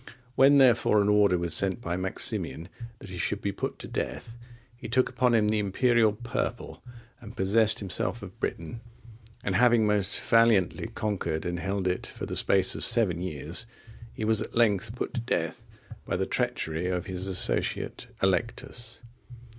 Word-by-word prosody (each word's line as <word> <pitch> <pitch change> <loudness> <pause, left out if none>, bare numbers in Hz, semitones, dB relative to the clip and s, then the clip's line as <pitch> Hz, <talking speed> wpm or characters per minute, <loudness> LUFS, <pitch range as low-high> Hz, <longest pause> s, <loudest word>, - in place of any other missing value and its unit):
When, 135 +2 +5
therefore, 120 -5 +4
an 100 0 +2
order 105 -3 +4
was 85 -1 0
sent 95 +3 +2
by 85 -7 -3
Maximian 90 -2 -2 0.3
that 100 - -12
he 90 - -7
should 100 +4 -1
be 100 - -2
put - - -5
to - - -9
death, 115 - -5 0.4
he 120 - -9
took 130 +2 +2
upon 125 -2 +1
him 105 -2 +2
the 110 0 +1
imperial 110 +2 +2
purple, 115 +2 -5 0.4
and 110 -4 -12
possessed 105 +3 +3
himself 105 +3 -2
of 95 -2 -11
Britain, 85 +8 -4 0.6
and 95 - -1
having 115 +2 +4
most 105 -2 +1
valiantly 115 -5 +2
conquered 90 -7 -3
and 85 0 -3
held 95 +1 -2
it 90 0 -2
for - - -7
the - - -5
space - - +3
of - - -3
seven 100 -8 +2
years, 85 +5 -4 0.4
he 110 - -5
was 110 -1 +2
at - - -7
length 110 -1 +1
put - - -4
to 125 - -2
death 85 -8 -3 0.4
by - - -1
the - - -1
treachery 80 +3 -2
of 90 -1 -2
his 95 0 -4
associate 95 -1 0 0.2
Allectus. 115 +5 -2
105 Hz, 170 wpm, -27 LUFS, 90-115 Hz, 0.6 s, When